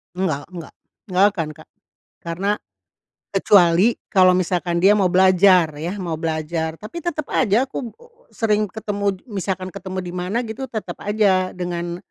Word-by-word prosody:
Enggak 165 -6 -2
enggak, 170 -3 -9 0.4
enggak 185 +2 +4
akan 165 -5 -2
Kak, 155 - -16 0.5
karena, 175 +4 -1 0.8
kecuali 195 +2 +4 0.2
kalau 185 -1 +6
misalkan 175 -1 -1
dia 195 +4 +5
mau 195 -3 +2
belajar 185 0 +5 0.2
ya 175 +5 -3
mau 175 -4 -4
belajar, 160 0 -2
tapi 215 - -8
tetep 310 -3 -3
aja 235 +1 +3
aku 260 -2 -6 0.4
sering 215 -2 0
ketemu 200 -1 -2
misalkan 190 -4 -4
ketemu 190 -1 -5
di 175 - -6
mana 180 +4 -2
gitu 235 +4 -6
tetep 220 -3 -5
aja 200 -3 +2
dengan, 175 -1 -4
185 Hz, 145 wpm, -21 LUFS, 175-210 Hz, 0.8 s, kalau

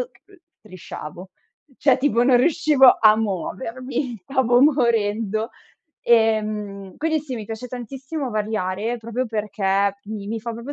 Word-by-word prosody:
uhm, 440 -5 -10 0.2
strisciavo. 185 -2 -10 0.5
Cioè, 270 -2 +4
tipo 255 -4 +2
non 255 -1 +5
riuscivo 290 -2 +5
a 215 -1 +7
muovermi, 240 - -3
stavo 245 -1 +2
morendo. 225 -5 +1 0.5
Ehm, 215 -4 +1
quindi 315 0 0
sì, 275 -4 -6
mi 220 - -6
piace 225 +3 -6
tantissimo 265 +4 -5
variare, 215 +1 -2
proprio 230 +3 -3
perché 200 -2 0
mi 205 -1 -6
mi 225 0 -3
fa 235 +1 -5
proprio 235 +5 -7
230 Hz, 130 wpm, -22 LUFS, 210-260 Hz, 0.5 s, a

